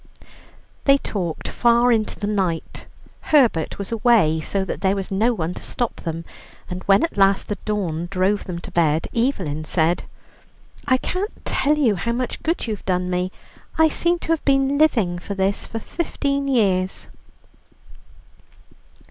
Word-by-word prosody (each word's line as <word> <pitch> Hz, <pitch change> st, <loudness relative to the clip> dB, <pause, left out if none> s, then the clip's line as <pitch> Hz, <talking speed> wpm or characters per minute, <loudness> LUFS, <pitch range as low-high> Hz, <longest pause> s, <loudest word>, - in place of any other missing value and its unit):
They 275 Hz, 0 st, +6 dB
talked 180 Hz, -, -4 dB
far 240 Hz, +1 st, +3 dB
into 220 Hz, -2 st, 0 dB
the 205 Hz, -, -2 dB
night. 190 Hz, -5 st, -2 dB, 0.4 s
Herbert 245 Hz, -, +3 dB
was 200 Hz, +1 st, -5 dB
away, 220 Hz, -9 st, +3 dB
so 195 Hz, +4 st, -2 dB
that 170 Hz, -, -5 dB
there 195 Hz, 0 st, +2 dB
was 195 Hz, 0 st, -4 dB
no 215 Hz, +5 st, +2 dB
one 175 Hz, -6 st, -2 dB
to -, -, -9 dB
stop 240 Hz, -2 st, -3 dB
them, 165 Hz, 0 st, -5 dB, 0.5 s
and 180 Hz, +1 st, -4 dB
when 195 Hz, 0 st, +5 dB
at 330 Hz, -, -2 dB
last 195 Hz, 0 st, +3 dB
the 205 Hz, -, -2 dB
dawn 175 Hz, -6 st, -2 dB
drove 195 Hz, +2 st, 0 dB
them 180 Hz, -2 st, -5 dB
to -, -, -9 dB
bed, 160 Hz, -2 st, +2 dB
Evelyn 190 Hz, -, 0 dB
said: 165 Hz, +2 st, +1 dB, 0.8 s
"I 255 Hz, -, +4 dB
can't 375 Hz, -, -4 dB
tell 300 Hz, +2 st, +1 dB
you 235 Hz, -9 st, +2 dB
how 235 Hz, +7 st, -1 dB
much 245 Hz, 0 st, -3 dB
good 330 Hz, +2 st, -1 dB
you've 215 Hz, -4 st, -4 dB
done 180 Hz, -1 st, 0 dB
me. 180 Hz, +1 st, -1 dB, 0.5 s
I 320 Hz, 0 st, +5 dB
seem 345 Hz, +3 st, +1 dB
to -, -, -9 dB
have 330 Hz, -1 st, +1 dB
been 275 Hz, 0 st, +2 dB
living 215 Hz, -, +2 dB
for 200 Hz, +3 st, -6 dB
this 195 Hz, +1 st, -1 dB
for 225 Hz, -, -5 dB
fifteen 280 Hz, +1 st, -2 dB
years." 195 Hz, -8 st, +1 dB
205 Hz, 160 wpm, -22 LUFS, 180-250 Hz, 0.8 s, They